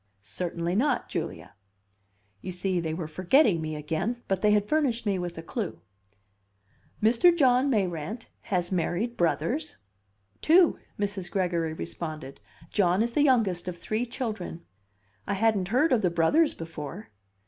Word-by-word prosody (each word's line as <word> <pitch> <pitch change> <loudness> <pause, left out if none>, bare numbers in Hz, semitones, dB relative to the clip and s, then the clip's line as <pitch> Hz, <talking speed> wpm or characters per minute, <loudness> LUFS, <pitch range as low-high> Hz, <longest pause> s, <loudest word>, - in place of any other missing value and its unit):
"Certainly 170 - -3
not, 265 +9 +1
Julia." - - -5 0.9
You - - -5
see, 180 0 -1
they 160 -2 -2
were 160 0 -4
forgetting 185 - +3
me 155 -1 -3
again; 160 +11 -3
but 190 -1 0
they 210 - +4
had 210 0 +3
furnished 265 -6 +1
me 195 -3 +1
with 175 -1 -5
a 165 - -6
clue. 205 +1 -4 1.2
"Mr. 235 +11 +6
John 260 -2 +4
Mayrant 195 - -2 0.2
has 180 -3 0
married 190 +6 -1
brothers?" 255 - 0 0.6
"Two," 340 +1 +5 0.2
Mrs. 200 -3 -2
Gregory 170 -4 0
responded. 155 -4 -6 0.3
"John 185 0 +3
is 235 - -1
the 295 - +2
youngest 220 -11 +2
of 180 -1 -4
three 220 +7 -2
children." 215 -9 -5 0.6
"I - - 0
hadn't 205 -3 +2
heard 255 - +2
of 235 - +3
the 180 - +2
brothers 175 - +3
before." 165 +3 -7
190 Hz, 145 wpm, -27 LUFS, 170-235 Hz, 1.2 s, Mr